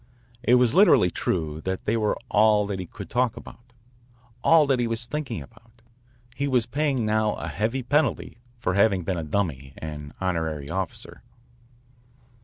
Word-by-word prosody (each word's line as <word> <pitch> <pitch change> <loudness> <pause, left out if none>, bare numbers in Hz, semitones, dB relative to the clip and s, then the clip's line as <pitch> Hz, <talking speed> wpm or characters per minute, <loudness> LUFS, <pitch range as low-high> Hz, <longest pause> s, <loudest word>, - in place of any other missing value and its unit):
It 125 0 +4
was 125 -2 +3
literally 140 - +5
true 80 -1 -2
that 95 0 -3
they 110 - +1
were 110 -2 0
all 105 0 +4
that 100 -2 -4
he 90 - -5
could - - -9
talk 125 -2 0
about, 120 +1 -13 0.7
all 165 -2 +6
that 135 -3 +1
he 120 - +1
was 115 +1 -2
thinking 135 -3 -4
about. 115 0 -22 0.5
He 140 - -1
was 125 -4 +2
paying 135 -2 0
now 110 0 +1
a - - -6
heavy 115 +6 -2
penalty 145 -2 0 0.2
for 105 -6 -1
having 100 -1 +3
been 90 +2 -2
a - - -4
dummy 75 -5 -3
and 75 -2 -7
honorary 80 -5 -2
officer. 95 -1 -5
110 Hz, 165 wpm, -25 LUFS, 90-125 Hz, 0.7 s, all